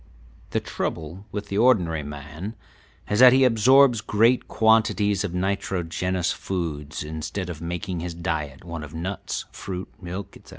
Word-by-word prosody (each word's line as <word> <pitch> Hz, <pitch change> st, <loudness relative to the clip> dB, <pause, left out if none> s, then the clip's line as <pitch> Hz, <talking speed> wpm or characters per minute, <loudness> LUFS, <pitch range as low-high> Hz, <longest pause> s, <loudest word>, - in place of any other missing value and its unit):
The -, -, 0 dB
trouble 85 Hz, +6 st, -5 dB
with 105 Hz, 0 st, -5 dB
the 100 Hz, -, 0 dB
ordinary 90 Hz, -10 st, +3 dB
man 75 Hz, +8 st, -7 dB, 0.5 s
is 105 Hz, -, 0 dB
that 125 Hz, 0 st, +9 dB
he 135 Hz, +1 st, +5 dB
absorbs 125 Hz, 0 st, +5 dB
great 115 Hz, +5 st, +3 dB
quantities 110 Hz, -2 st, +3 dB
of 90 Hz, -4 st, -3 dB
nitrogenous 90 Hz, -1 st, -1 dB
foods 80 Hz, -6 st, -4 dB
instead 80 Hz, +4 st, -4 dB
of 80 Hz, -2 st, -9 dB
making 90 Hz, +1 st, -3 dB
his 85 Hz, 0 st, -5 dB
diet 75 Hz, -5 st, -3 dB
one 85 Hz, -2 st, -6 dB
of 75 Hz, +1 st, -9 dB
nuts, 95 Hz, +4 st, -4 dB
fruit, 95 Hz, -1 st, -6 dB
milk, 95 Hz, +2 st, -6 dB
etc. -, -, -16 dB
90 Hz, 145 wpm, -24 LUFS, 80-105 Hz, 0.5 s, that